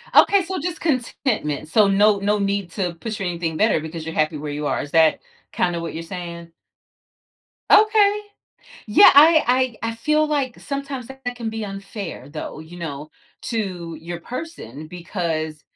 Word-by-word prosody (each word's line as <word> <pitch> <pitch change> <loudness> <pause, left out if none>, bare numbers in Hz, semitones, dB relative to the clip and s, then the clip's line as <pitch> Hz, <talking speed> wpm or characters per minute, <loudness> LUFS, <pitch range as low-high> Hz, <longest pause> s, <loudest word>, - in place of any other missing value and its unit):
Okay. 395 -2 +6
So 375 +2 -4
just 320 +1 -4
contentment. 235 - -1
So 210 +2 +5
no 205 +1 +4
no 205 +1 +1
need 200 -3 -1
to 180 -2 -2
push 215 +5 -5
for - - -4
anything 170 -3 -2
better 215 -4 +3
because 160 +1 -7
you're 160 - -5
happy 155 0 +1
where 150 0 -5
you 150 +1 -4
are. - - 0
Is 145 - -8
that 160 -1 +4 0.3
kinda 175 -1 0
what 165 0 -5
you're 165 - -5
saying? 170 -1 -7 1.2
Okay. 420 -1 +5 0.7
Yeah, 210 - +8
I 260 -5 +5
I 230 - -1
I - - -6
feel 305 +6 +1
like 280 -5 -1
sometimes 275 -3 -5
that 265 -1 -12
can 230 -2 -4
be 220 0 -4
unfair, 195 - -7
though, 155 0 -6
you 165 +3 -11
know, 150 -2 -6 0.3
to 185 -8 -4
your 170 +1 -6
person, 170 - -7
because, 165 -3 -4
195 Hz, 170 wpm, -22 LUFS, 165-255 Hz, 1.2 s, Yeah